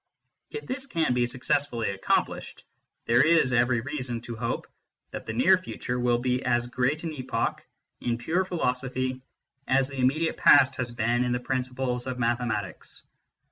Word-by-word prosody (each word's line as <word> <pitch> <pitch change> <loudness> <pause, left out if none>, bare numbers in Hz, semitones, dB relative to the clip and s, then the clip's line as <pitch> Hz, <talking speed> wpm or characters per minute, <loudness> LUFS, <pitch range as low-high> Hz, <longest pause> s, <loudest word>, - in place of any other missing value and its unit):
If 440 - -7
this 265 +1 -5
can 165 - +1
be 120 -1 +2
successfully 125 -2 -1
accomplished, 95 0 -1 0.4
there 120 +2 +4
is 160 -5 +4
every 120 -1 +3
reason 130 -3 -4
to 120 0 -7
hope 115 +1 -3 0.5
that - - -7
the 110 - -3
near 180 +11 +5
future 125 -8 -4
will 120 -1 +2
be 125 +1 -1
as 120 0 +1
great 130 +6 -1
an 165 -2 -3
epoch 130 -3 -2 0.4
in 120 -1 -1
pure 165 +10 0
philosophy 130 -6 -2 0.5
as 135 +1 +2
the 135 -1 -7
immediate 145 +6 +1
past 135 -1 +6
has 125 -2 -3
been 120 +1 +1
in 125 0 0
the 125 - 0
principles 125 -1 -2
of 130 -1 -3
mathematics. 115 -6 -2
125 Hz, 160 wpm, -27 LUFS, 120-135 Hz, 0.5 s, past